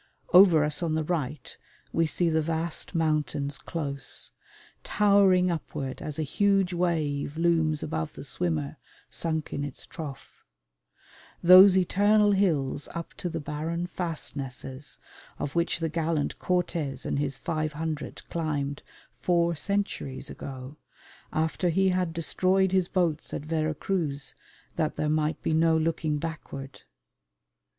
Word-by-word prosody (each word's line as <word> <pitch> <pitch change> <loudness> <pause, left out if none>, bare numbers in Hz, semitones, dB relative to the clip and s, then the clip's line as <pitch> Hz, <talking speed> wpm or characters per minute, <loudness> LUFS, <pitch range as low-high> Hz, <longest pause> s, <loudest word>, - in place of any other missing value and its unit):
Over 180 -4 +8
us 150 +2 0
on 165 -2 0
the 160 - 0
right 150 -4 -3 0.4
we 165 0 +2
see 175 +2 +1
the 160 0 +2
vast 165 +2 -2
mountains 150 -3 0
close, 140 -4 -4 0.5
towering 195 -3 +4
upward 135 -5 -4
as 150 -2 -4
a 160 - 0
huge 195 +4 +2
wave 155 -4 -1
looms 160 -3 +2
above 80 -1 -3
the - - -9
swimmer 80 -4 -2 0.3
sunk 160 -2 -1
in 145 - -2
its 145 -3 -6
trough, 145 -5 -9 1.0
those 185 +2 +9
eternal 205 +3 +4
hills 155 -9 +1
up 170 0 -5
to 175 - -3
the 165 -1 -3
barren 155 +4 -3
fastnesses 145 -6 -4 0.4
of 145 - -4
which 170 0 +1
the 165 -1 -1
gallant 160 -1 -1
Cortes 170 -6 -1
and - - -1
his 140 -2 -1
five 155 -1 -2
hundred 155 -1 -5
climbed 145 -4 -2 0.4
four 170 -1 +2
centuries 145 -6 -2
ago, 135 +2 -8 0.5
after 160 +3 0
he 190 +3 +3
had 180 -2 0
destroyed 185 +3 +1
his 185 -2 +2
boats 170 -5 0
at 145 - -5
Vera 155 -1 0
Cruz 150 -7 -2 0.4
that 155 -2 0
there 150 - -1
might 155 0 +1
be - - +1
no 160 0 +4
looking 160 -1 0
backward. 145 -3 -6
160 Hz, 135 wpm, -27 LUFS, 145-175 Hz, 1.0 s, those